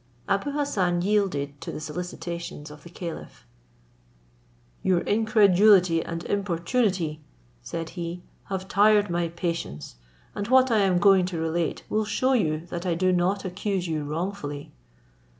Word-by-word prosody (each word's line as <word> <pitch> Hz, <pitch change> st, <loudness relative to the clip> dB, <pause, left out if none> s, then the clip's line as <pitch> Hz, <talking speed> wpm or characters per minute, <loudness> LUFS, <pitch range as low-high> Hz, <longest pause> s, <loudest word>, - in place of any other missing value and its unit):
Abou 200 Hz, +9 st, 0 dB
Hassan 185 Hz, -12 st, 0 dB
yielded 180 Hz, -9 st, 0 dB
to -, -, -5 dB
the -, -, -6 dB
solicitations 170 Hz, -1 st, -6 dB
of 150 Hz, 0 st, -12 dB
the 170 Hz, -, -12 dB
caliph. 170 Hz, -, -8 dB, 1.4 s
"Your 180 Hz, -2 st, +2 dB
incredulity 200 Hz, -5 st, +4 dB
and 170 Hz, 0 st, -5 dB
importunity," 185 Hz, -3 st, -1 dB, 0.4 s
said 165 Hz, -, -5 dB
he, 175 Hz, 0 st, -6 dB, 0.2 s
"have 190 Hz, -1 st, -4 dB
tired 205 Hz, -1 st, +4 dB
my 170 Hz, 0 st, 0 dB
patience; 165 Hz, -, -4 dB, 0.4 s
and 205 Hz, 0 st, -4 dB
what 260 Hz, 0 st, +5 dB
I 220 Hz, -, +4 dB
am 190 Hz, -3 st, +3 dB
going 195 Hz, -1 st, +5 dB
to 180 Hz, -2 st, -4 dB
relate 165 Hz, +1 st, -1 dB
will 215 Hz, 0 st, 0 dB
shew 255 Hz, +5 st, +1 dB
you 160 Hz, -9 st, 0 dB
that 170 Hz, 0 st, -4 dB
I 175 Hz, -3 st, 0 dB
do 185 Hz, +2 st, +2 dB
not 185 Hz, +3 st, +1 dB
accuse 185 Hz, 0 st, -2 dB
you 155 Hz, -2 st, -2 dB
wrongfully." 150 Hz, -2 st, -4 dB
180 Hz, 140 wpm, -26 LUFS, 165-200 Hz, 1.4 s, what